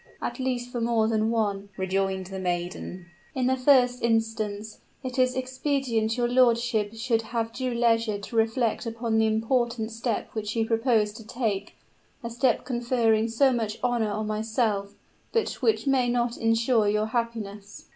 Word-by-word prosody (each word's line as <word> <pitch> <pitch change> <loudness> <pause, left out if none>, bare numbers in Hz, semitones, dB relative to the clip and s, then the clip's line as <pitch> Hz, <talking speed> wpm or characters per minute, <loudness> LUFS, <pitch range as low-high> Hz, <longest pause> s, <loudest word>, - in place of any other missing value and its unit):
"At - - -4
least 250 -1 -2
for 240 - -3
more 230 -1 +2
than 220 0 +1
one," 205 -3 -1
rejoined 190 0 -1
the 190 +1 -6
maiden. 180 0 -3 0.3
"In 255 -1 0
the 260 +1 +3
first 255 -2 +4
instance, 220 -2 -1 0.2
it 255 0 -4
is 255 0 +3
expedient 260 -3 -1
your 240 -1 +2
lordship 235 -3 +2
should 225 0 0
have 225 0 -3
due 255 -1 -2
leisure 230 -2 +2
to 200 +3 -9
reflect 225 +1 +1
upon 230 -1 -1
the 220 - +3
important 225 +1 0
step 230 0 -3
which 215 0 -3
you 225 -1 +1
propose 225 -2 +2
to 225 +1 -10
take 215 -3 -3 0.5
a 235 - -4
step 240 +1 +1
conferring 235 -3 +1
so 265 +4 +3
much 225 -2 -2
honor 240 -3 +1
on 215 +1 -2
myself, 215 -2 -1 0.4
but 455 - +1
which 445 - +2
may 260 -3 +2
not 240 0 0
insure 225 -1 +2
your 210 +1 +1
happiness." 220 -3 -4
225 Hz, 160 wpm, -26 LUFS, 215-245 Hz, 0.5 s, first